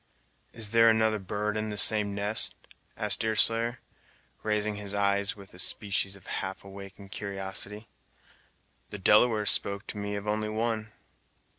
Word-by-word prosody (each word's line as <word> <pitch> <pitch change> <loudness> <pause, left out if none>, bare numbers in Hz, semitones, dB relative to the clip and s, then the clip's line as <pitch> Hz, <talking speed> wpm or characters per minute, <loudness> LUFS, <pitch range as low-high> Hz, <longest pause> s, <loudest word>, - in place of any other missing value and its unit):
"Is 110 -3 -4
there 115 0 +6
another 110 -1 +2
bird 105 +2 -3
in 110 0 -2
the 105 - -5
same 105 -1 +6
nest!" 105 +2 +1 0.4
asked - - +1
Deerslayer, 115 +2 +2 0.6
raising 105 0 -1
his 100 -1 -3
eyes 100 0 +1
with 100 -2 -14
a 90 - -10
species 100 0 0
of 95 - -17
half 95 0 -5
awakened 100 0 -11
curiosity, 100 +1 -5 1.0
"the 105 - -7
Delawares 105 +2 +4
spoke 100 +1 -1
to 105 - -7
me 100 0 -3
only 105 +1 -2
of 110 - -5
one." 110 -1 -2
105 Hz, 145 wpm, -28 LUFS, 100-110 Hz, 1.0 s, there